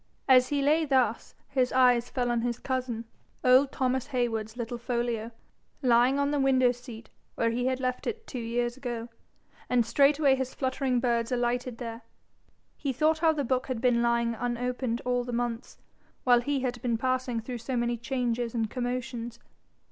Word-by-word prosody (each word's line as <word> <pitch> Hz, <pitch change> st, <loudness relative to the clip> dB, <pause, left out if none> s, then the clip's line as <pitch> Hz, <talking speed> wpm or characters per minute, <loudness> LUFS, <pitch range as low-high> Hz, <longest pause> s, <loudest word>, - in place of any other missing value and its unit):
As 255 Hz, -1 st, +6 dB
he 285 Hz, 0 st, 0 dB
lay 310 Hz, +3 st, +3 dB
thus, 260 Hz, -6 st, +1 dB
his 255 Hz, -2 st, +1 dB
eyes 250 Hz, -2 st, +4 dB
fell 245 Hz, -1 st, -1 dB
on 235 Hz, -1 st, +1 dB
his 240 Hz, -1 st, -1 dB
cousin, 250 Hz, -3 st, -3 dB, 0.4 s
old 260 Hz, +2 st, +5 dB
Thomas 260 Hz, 0 st, -1 dB
Heywood's 235 Hz, -4 st, -2 dB
little 235 Hz, 0 st, -4 dB
folio, 235 Hz, -2 st, -2 dB, 0.5 s
lying 245 Hz, +2 st, +4 dB
on 280 Hz, 0 st, +1 dB
the 290 Hz, -, 0 dB
window 260 Hz, -2 st, +4 dB
seat 240 Hz, -2 st, -11 dB, 0.2 s
where 230 Hz, 0 st, +1 dB
he 245 Hz, +2 st, -1 dB
had 260 Hz, 0 st, 0 dB
left 255 Hz, -1 st, -2 dB
it 450 Hz, -1 st, -4 dB
two 255 Hz, -, -6 dB
years 240 Hz, +1 st, -1 dB
ago, 240 Hz, -3 st, -5 dB, 0.6 s
and 245 Hz, -2 st, +3 dB
straightway 280 Hz, +3 st, +4 dB
his 260 Hz, -1 st, -2 dB
fluttering 260 Hz, -1 st, 0 dB
birds 235 Hz, -1 st, 0 dB
alighting 245 Hz, 0 st, -1 dB
there, 230 Hz, -1 st, -6 dB, 0.7 s
he 280 Hz, -, -2 dB
thought 310 Hz, +4 st, +2 dB
how 325 Hz, 0 st, +4 dB
the 300 Hz, -2 st, -1 dB
book 255 Hz, 0 st, 0 dB
had 255 Hz, -3 st, -2 dB
been 245 Hz, -1 st, +3 dB
lying 235 Hz, 0 st, +1 dB
unopened 245 Hz, 0 st, -2 dB
all 245 Hz, 0 st, +1 dB
the 245 Hz, -, -6 dB
months, 240 Hz, 0 st, -3 dB, 0.5 s
while 245 Hz, -1 st, +5 dB
he 280 Hz, +2 st, -1 dB
had 245 Hz, -2 st, -3 dB
been 235 Hz, -2 st, 0 dB
passing 255 Hz, -1 st, -1 dB
through 240 Hz, +2 st, -6 dB
so 245 Hz, +2 st, -3 dB
many 240 Hz, 0 st, 0 dB
changes 240 Hz, -1 st, -2 dB
and 225 Hz, -2 st, -1 dB
commotions. 245 Hz, -2 st, -4 dB
245 Hz, 175 wpm, -28 LUFS, 235-260 Hz, 0.7 s, As